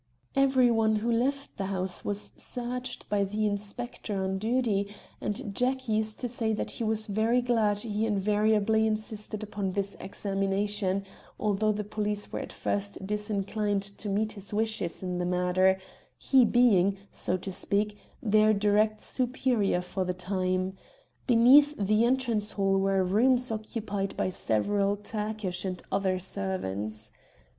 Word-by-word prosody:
"Every 265 -3 +4
one 220 -1 +3
who 225 +3 0
left 275 +4 -1
the 195 - -2
house 185 -1 -2
was 205 0 0
searched 250 +1 -4
by 205 -1 +1
the 210 +2 -1
inspector 205 0 -3
on 190 0 -1
duty, 220 -3 0 0.3
and 205 0 -3
Jack 260 +3 0
used 215 0 0
to 250 - -1
say 225 -2 -1
that 215 - -1
he - - -3
was 220 0 0
very 220 +4 +2
glad 225 -4 +2
he 215 0 -1
invariably 215 +1 +2
insisted 215 0 -3
upon 200 -3 -3
this 200 0 -2
examination, 195 0 -1 0.3
although 215 +1 +1
the 210 0 -2
police 210 0 -3
were - - -3
at - - -6
first 200 -1 -3
disinclined 210 0 -1 0.2
to 210 - -3
meet 215 +2 0
his 200 -1 -7
wishes 215 -5 -1
in 180 -1 -2
the - - 0
matter, 180 +1 +2 0.4
he 260 -3 +4
being, 200 -5 +4
so 185 - -1
to 190 +1 -6
speak, 200 +2 0 0.3
their 215 0 +4
direct 210 +1 +2
superior 245 -7 0
for 185 +1 -3
the 180 0 -2
time. 185 0 -1 0.5
Beneath 265 +5 +6
the 215 +3 +2
entrance 235 -4 +1
hall 195 -1 +2
were 195 -1 +2
rooms 245 +6 +3
occupied 210 -2 -3
by - - 0
several 200 - 0
Turkish 210 -3 -3
and 185 -2 -3
other 190 -1 +1
servants. 110 - -4
210 Hz, 145 wpm, -28 LUFS, 195-220 Hz, 0.5 s, Beneath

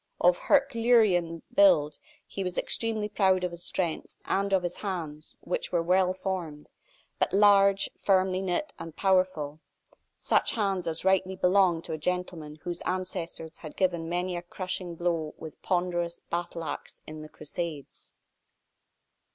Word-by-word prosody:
Of - - +4
herculean 220 - +3
build, 255 - +5 0.3
he 195 - -5
was 180 -1 -3
extremely 220 -2 0
proud 190 -3 +2
of 180 - -1
his 170 0 -8
strength, 170 -4 -2
and 200 0 0
of 190 -2 +3
his 175 - -3
hands, 160 -6 -5
which 180 - -3
were 170 -2 +1
well 185 +1 +3
formed, 185 -5 -5 0.5
but - - +1
large, 200 -1 +5
firmly 190 -1 +2
knit 195 +11 -2
and 165 -2 -8
powerful, 185 -6 +1 0.6
such - - +2
hands 195 -5 -1
as 165 +2 -3
rightly 190 0 +2
belonged 180 -2 +3
to - - -5
a 155 - -4
gentleman 170 -3 -3
whose 175 -1 -4
ancestors 180 -3 -4
had 155 - -10
given 175 -3 0
many 180 +1 -1
a 175 - -3
crushing 180 0 -4
blow 165 -2 -1
with 160 -1 -10
ponderous 175 -1 -1
battle 170 -1 -3
axe - - -7
in 155 0 -8
the 155 - -10
crusades. 150 -1 -7
180 Hz, 145 wpm, -28 LUFS, 165-190 Hz, 0.6 s, build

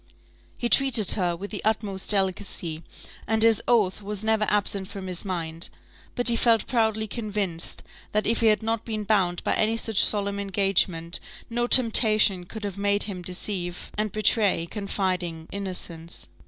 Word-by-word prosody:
He 240 - -1
treated 235 -6 +4
her 175 -4 +3
with 200 +4 -8
the 205 - -5
utmost 210 -3 -2
delicacy, 190 -5 -1 0.5
and 220 0 +2
his 225 -1 +5
oath 210 -5 +2
was 205 0 -5
never 220 -1 +2
absent 200 -2 -1
from 195 -1 -8
his 180 -1 -1
mind: 165 -3 -3 0.5
but 245 - 0
he 235 - +8
felt 230 -2 +3
proudly 220 -3 0
convinced, 205 -6 -4 0.3
that 210 0 0
if 230 +1 +1
he 230 - +3
had 215 -1 +3
not 225 0 -1
been 215 -2 -4
bound 190 -4 +1
by - - 0
any 220 +1 +2
such 225 -3 +1
solemn 200 -1 +1
engagement, 195 -4 +1 0.3
no 240 +1 0
temptation 215 -7 +4
could 220 +2 -8
have 200 -1 -5
made 205 0 +1
him 195 -3 -5
deceive 180 0 -3
and 215 -1 0
betray 210 -4 +2
confiding 180 -4 -3
innocence. 175 -4 -6
205 Hz, 160 wpm, -25 LUFS, 185-220 Hz, 0.5 s, he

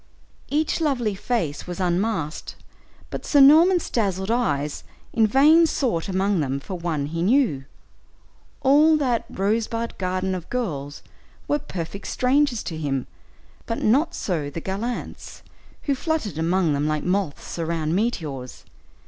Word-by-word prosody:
Each 310 +3 0
lovely 250 -9 0
face 190 - -2
was 180 +1 -6
unmasked, 180 -3 -1 0.6
but - - -5
Sir 290 - +3
Norman's 325 +6 +6
dazzled 195 -3 0
eyes 150 - -1 0.3
in 225 -1 +4
vain 305 +8 +6
sought 225 - -1
among 190 0 +1
them 140 -2 -1
for 165 - -8
one 170 -5 -2
he 165 +3 -4
knew. 200 - +2 1.0
All 300 +3 +5
that 250 -6 0
"rosebud 230 +3 -1
garden 185 0 -1
of 180 -2 -6
girls" 150 - -4 0.4
were 295 - +1
perfect 185 - -6
strangers 260 -2 +1
to 165 - -5
him, 135 -4 -2 0.6
but 230 - -3
not 275 +10 +2
so 160 -7 -2
the 145 - -5
gallants, 205 +8 -5 0.4
who 285 - +1
fluttered 265 - -2
among 170 -1 +2
them 145 +1 0
like 155 -1 -1
moths 180 -3 -2
around 160 -1 -1
meteors. 155 - -3
195 Hz, 135 wpm, -23 LUFS, 160-250 Hz, 1.0 s, Norman's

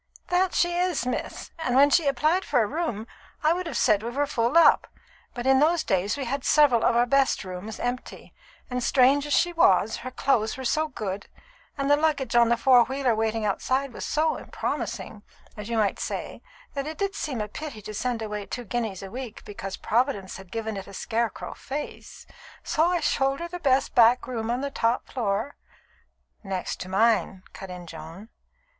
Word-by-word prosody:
"That 360 +1 +2
she 345 0 +2
is, 355 -7 0
miss; 250 - -4
and 255 -6 -1
when 285 +2 +6
she 320 0 +4
applied 305 +7 +2
for 250 -5 +2
a - - 0
room, 240 -5 -3 0.4
I 310 +2 +4
would 360 0 -3
have - - -3
said 210 -4 +3
we 230 - -4
were 280 +4 0
full 240 +3 +1
up, 335 - +6 0.5
but 240 0 -5
in 265 0 +5
those 320 +2 +3
days 195 +6 0
we 275 - -3
had 270 +2 -3
several 280 -7 +4
of - - +3
our 240 +1 +4
best 275 -1 +2
rooms 185 +3 -7
empty, 245 +1 -5 0.3
and, 250 0 -3
strange 275 +3 +4
as 295 - -1
she 350 0 +3
was, 335 - +3
her 255 - -6
clothes 250 -4 0
were 260 - -6
so 310 +5 +1
good, 205 -8 -5 0.5
and 275 0 -1
the 290 - +6
luggage 295 -5 0
on 235 -1 +5
the 235 - +3
four 250 0 +6
wheeler 265 -2 0
waiting 220 0 -1
outside 260 +6 -1
was - - -7
so 315 +1 0
promising, 215 - -4 0.3
as 210 +1 -7
you 230 - -1
might 210 -3 +1
say, - - -5 0.3
that 275 +1 -3
it 315 - -6
did 395 -1 -1
seem 285 - -3
a 210 - -2
pity 285 +1 -7
to 215 - -7
send 235 +1 -2
away 210 -2 -5
two 245 - -5
guineas 220 -5 -3
a 195 - -8
week 245 -3 -7
because 200 -2 -6
Providence 225 -5 -1
had 190 -2 -13
given 220 -2 -3
it 195 - -7
a 200 - -10
scarecrow 230 0 -2
face. 285 +2 -7 0.4
So 320 +2 +2
I 350 -1 +1
showed 270 -1 +1
her 340 - -4
the 355 +1 -7
best 275 -4 +2
back 240 0 +5
room 230 -3 -4
on 245 +2 0
the 280 0 -3
top 230 -1 0
floor 225 +2 -2 0.4
" - - -43
"Next 190 -2 -4
to 185 - -6
mine," 195 -2 +2
cut 190 - -9
in 180 -1 -8
Joan. 165 +6 -10
245 Hz, 200 wpm, -26 LUFS, 215-285 Hz, 0.5 s, when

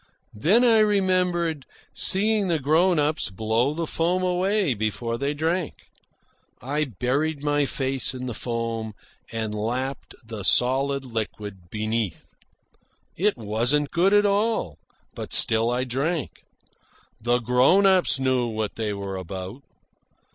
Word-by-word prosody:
Then 185 - +3
I 230 -2 +5
remembered 180 -7 +1 0.3
seeing 210 +1 +2
the 170 -2 +1
grown 160 +5 +2
ups 150 -2 +1
blow 110 +8 0
the 165 0 -2
foam 175 +4 0
away 185 -2 +1
before 110 +2 -2
they 140 +4 -2
drank. 165 +2 -1 0.8
I 145 +5 -1
buried 140 - -2
my 145 -1 +1
face 135 -1 -1
in 130 0 -6
the 125 - -4
foam 115 -1 -4 0.4
and 110 -2 -3
lapped 125 +6 -4
the 110 -2 -7
solid 135 +6 +3
liquid 105 -6 -6
beneath. 110 -1 -3 0.8
It 205 +4 +1
wasn't 120 +7 0
good 180 +3 +3
at 205 0 +4
all. 205 - 0 0.3
But - - -7
still 115 +1 +3
I 125 +1 0
drank. 140 +5 -3 0.8
The 120 +2 +2
grown 125 - +3
ups 185 -7 +3
knew 130 -2 +1
what 110 -2 -4
they 110 -2 -2
were 100 -1 -5
about. 95 +6 -7
135 Hz, 130 wpm, -24 LUFS, 115-170 Hz, 0.8 s, I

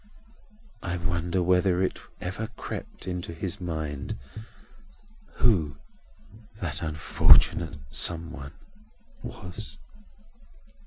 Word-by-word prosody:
I 90 -1 -2
wonder 85 +1 0
whether 90 +1 +4
it 95 - 0 0.2
ever 95 +5 -3
crept - - -6
into 90 -2 -3
his 95 +3 -3
mind 80 -6 -3 1.2
who 80 - +3 0.8
that 85 -7 -3
unfortunate 80 +1 +5
some 85 +2 +3
one 70 -3 -8 0.7
was!" 90 +5 -7
85 Hz, 85 wpm, -28 LUFS, 80-90 Hz, 1.2 s, unfortunate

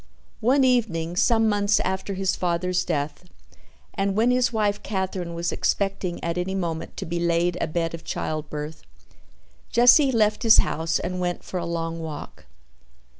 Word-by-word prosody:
One 260 +5 +3
evening, 195 -10 +1
some 225 +4 +3
months 205 -1 +2
after 190 +1 -2
his 190 0 0
father's 180 +1 0
death, 155 +1 -3 0.7
and 195 -1 -1
when 230 +4 +3
his 250 -1 +2
wife 210 -3 0
Katherine 190 -4 -3
was 170 +1 -1
expecting 195 -3 -1
at 170 +1 -1
any 190 +2 -2
moment 170 -4 -4
to - - -4
be 170 +1 -3
laid 170 0 +1
abed 165 +1 -1
of 165 - -7
childbirth, 150 0 -4 0.9
Jesse 250 +4 +6
left 215 -3 +2
his 225 -2 +6
house 165 +1 +1
and 180 0 -4
went 175 -1 -2
for 185 - -4
a 170 - -4
long 165 0 -3
walk. 160 -2 -8
180 Hz, 155 wpm, -24 LUFS, 165-210 Hz, 0.9 s, Jesse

